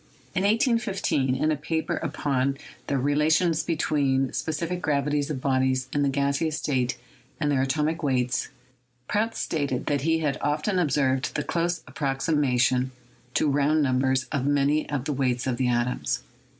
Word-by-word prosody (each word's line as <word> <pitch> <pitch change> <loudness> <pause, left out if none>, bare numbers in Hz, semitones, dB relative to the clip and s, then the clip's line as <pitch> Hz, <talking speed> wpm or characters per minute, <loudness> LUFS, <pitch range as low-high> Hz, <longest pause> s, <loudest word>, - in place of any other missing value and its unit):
In 185 - 0
181 205 - +1
5, 130 - -4
in 155 - +3
a - - +2
paper 160 +2 -2
upon 140 -3 -1 0.3
the 140 - 0
relations 155 +5 +2
between 140 -5 +1
the - - -8
spe - - -3
cific 170 +3 -2
gravities 145 -1 0
of 145 -4 -3
bodies 130 -1 +1
in 145 - +1
the 140 - +2
gaseous 140 +3 0
state 125 -4 -1 0.4
and 150 -2 +1
their 135 -2 +2
atom 140 +3 +1
ic 165 +1 -2
weights, 125 -4 0 0.6
Prout 225 +2 0
stated 140 -5 -2
that 145 -2 0
he 165 +3 +2
had 150 -4 -1
often 150 +6 0
observed 135 -4 +1
the 150 - 0
close 170 +2 -1
approximation 135 -2 +1 0.5
to - - +3
round 145 +2 +2
numbers 130 0 +2
of 140 -3 0
many 145 +1 +2
of 145 -3 -2
the 150 - -1
weights 130 -2 0
of 130 -2 -1
the 130 - +1
atoms. 120 +1 0
145 Hz, 165 wpm, -26 LUFS, 130-155 Hz, 0.6 s, in